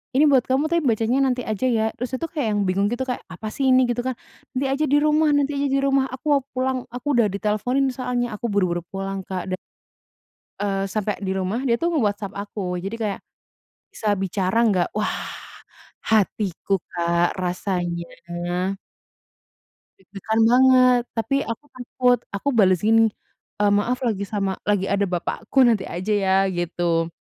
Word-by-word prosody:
"Ini 285 - +5
buat 260 -3 +4
kamu 275 +4 +1
tapi 340 -1 +3
bacanya 230 +3 +2
nanti 250 -1 0
aja 215 +3 -2
ya." 225 -3 +2
Terus 250 +2 -4
itu 295 - -3
kayak 290 -8 -1
yang - - +1
bingung 195 +2 +1
gitu 245 +2 -1
kayak, 255 -1 -4
"Apa 215 +4 -8
sih 270 +2 -1
ini?" 255 0 +6
Gitu 240 0 -1
kan, 260 - -1 0.4
"Nanti 260 +2 -1
aja 300 +3 +1
di 290 +2 +4
rumah 305 +1 +3
nanti 285 0 +1
aja 280 0 +1
di 275 0 +1
rumah 275 -1 +2
aku 260 +2 -10
mau 280 - +4
pulang, 260 0 0
aku 250 +4 -8
udah 230 - +4
diteleponin 215 +7 0
soalnya," 250 -2 -2
aku 235 - -6
buru-buru 180 -4 0
pulang 195 0 -4
Kak, 185 0 -4
da 185 - 0 1.0
eee. 195 -1 -1
sampai 210 +1 -2
di 190 -1 -2
rumah 190 +6 -1
dia 235 -2 +3
tuh 340 +6 -1
itu - - 0
nge-WhatsApp 205 -2 -1
aku, 205 +1 -7 0.2
jadi 200 +5 -5
kayak, 205 -2 -2 0.7
"Bisa 215 - -3
bicara 190 +1 -1
nggak?" 180 -4 +2
Wah, 215 - 0 0.9
hatiku 200 -3 +1
Kak, 170 +1 0
rasanya 180 -1 -2 1.9
deg-degan 200 +3 -3
banget, 255 0 +5
tapi 225 +5 0
aku 230 +5 -5
takut, 250 -1 +1
aku 200 +8 -4
balas 190 -7 +4
gini, 225 0 +5 0.5
eee, 205 -1 +4
"Maaf 230 +5 +1
lagi 200 -4 -1
sama 195 -2 -1 0.2
lagi 200 -2 +2
ada 200 0 0
bapakku, 185 +8 +1
nanti 225 -5 +2
aja 185 +5 -3
ya," 190 -2 +2 0.2
gitu. 170 -1 0
215 Hz, 170 wpm, -23 LUFS, 195-255 Hz, 1.9 s, ini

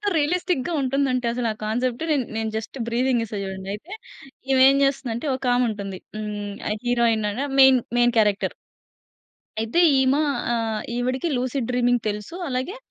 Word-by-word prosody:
ఎంత 420 - -13
రియలిస్టిక్‌గా 345 0 0
ఉంటుంది 275 +1 +1
అంటే 250 -1 -1
అసలు 240 -1 -1
ఆ - - -9
కాన్సెప్ట్ 245 +5 -1
నేన్ 275 -5 +2
నేను 225 0 -1
జస్ట్ 220 +4 -6
బ్రీఫింగ్ 240 0 +1
ఇస్తా 215 -2 -6
చూడండి. 190 0 -6
అయితే, 315 - -10 0.6
ఈమె 260 -1 +5
ఏం 275 - +4
జేస్తుందంటే 275 -1 -1
ఒక 265 - -11
ఆమె 250 0 +3
ఉంటుంది. 195 -3 -6 0.2
హ్మ్. 205 -1 -4 0.2
ఆ - - +2
హీరోయిన్ 230 -3 +2
అనె 270 +6 -2
మెయిన్ 265 -2 +7 0.2
మెయిన్ 240 0 +3
క్యారెక్టర్. 210 -1 +2 1.1
అయితే 225 +10 +1 0.2
ఈమ 265 +1 +3 0.4
ఆహ్, 225 -2 -1
ఈవిడకి 255 +6 -1
లూసిడ్ 250 -1 -2
డ్రీమింగ్ 245 -1 +2
తెలుసు. 210 +10 -5
అలాగే 260 - -3
245 Hz, 165 wpm, -23 LUFS, 220-265 Hz, 1.1 s, మెయిన్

